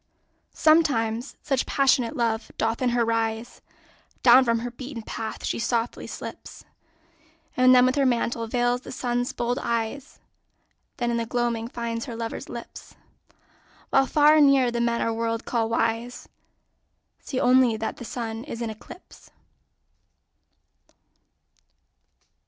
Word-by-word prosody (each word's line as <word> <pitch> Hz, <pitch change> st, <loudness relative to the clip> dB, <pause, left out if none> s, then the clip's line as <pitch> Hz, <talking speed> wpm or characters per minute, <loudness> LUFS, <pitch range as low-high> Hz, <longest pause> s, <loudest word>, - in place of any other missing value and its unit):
Sometimes 260 Hz, -7 st, +2 dB
such 270 Hz, -3 st, 0 dB
passionate 270 Hz, -1 st, +2 dB
love 230 Hz, -1 st, -1 dB
doth 225 Hz, +2 st, -1 dB
in 255 Hz, -, +2 dB
her 240 Hz, -1 st, +1 dB
rise, 225 Hz, 0 st, -2 dB, 0.6 s
Down 255 Hz, +1 st, +8 dB
from 230 Hz, -2 st, +1 dB
her 240 Hz, +1 st, -4 dB
beaten 250 Hz, -1 st, -8 dB
path 220 Hz, 0 st, -6 dB
she -, -, -2 dB
softly 235 Hz, 0 st, -2 dB
slips, -, -, -9 dB, 0.9 s
And 255 Hz, 0 st, +5 dB
with 255 Hz, -, +2 dB
her 280 Hz, -1 st, +1 dB
mantle 235 Hz, -1 st, -1 dB
veils 245 Hz, +1 st, 0 dB
the -, -, -10 dB
Sun's 245 Hz, -1 st, -2 dB
bold 240 Hz, +1 st, -2 dB
eyes, 235 Hz, +4 st, -3 dB, 0.8 s
Then 240 Hz, -1 st, -1 dB
in 235 Hz, -, 0 dB
the 230 Hz, -1 st, -2 dB
gloaming 235 Hz, -1 st, -1 dB
finds 230 Hz, -1 st, -4 dB
her 240 Hz, -4 st, -7 dB
lover's 230 Hz, 0 st, -5 dB
lips. 235 Hz, -1 st, -10 dB, 1.0 s
While 270 Hz, -, +4 dB
far 300 Hz, 0 st, +5 dB
and 295 Hz, -2 st, +7 dB
near 265 Hz, -3 st, +4 dB
the 235 Hz, 0 st, -1 dB
men 235 Hz, 0 st, 0 dB
our 230 Hz, -, 0 dB
world 230 Hz, 0 st, -2 dB
call 230 Hz, -2 st, -1 dB
wise 230 Hz, +2 st, -2 dB, 0.9 s
See 260 Hz, -, -4 dB
only 250 Hz, -2 st, +4 dB
that 220 Hz, 0 st, -4 dB
the -, -, -8 dB
Sun 225 Hz, -1 st, -5 dB
is 235 Hz, -6 st, -7 dB
in 225 Hz, -, -3 dB
eclipse. 220 Hz, -, -14 dB
235 Hz, 135 wpm, -25 LUFS, 230-255 Hz, 1.0 s, Down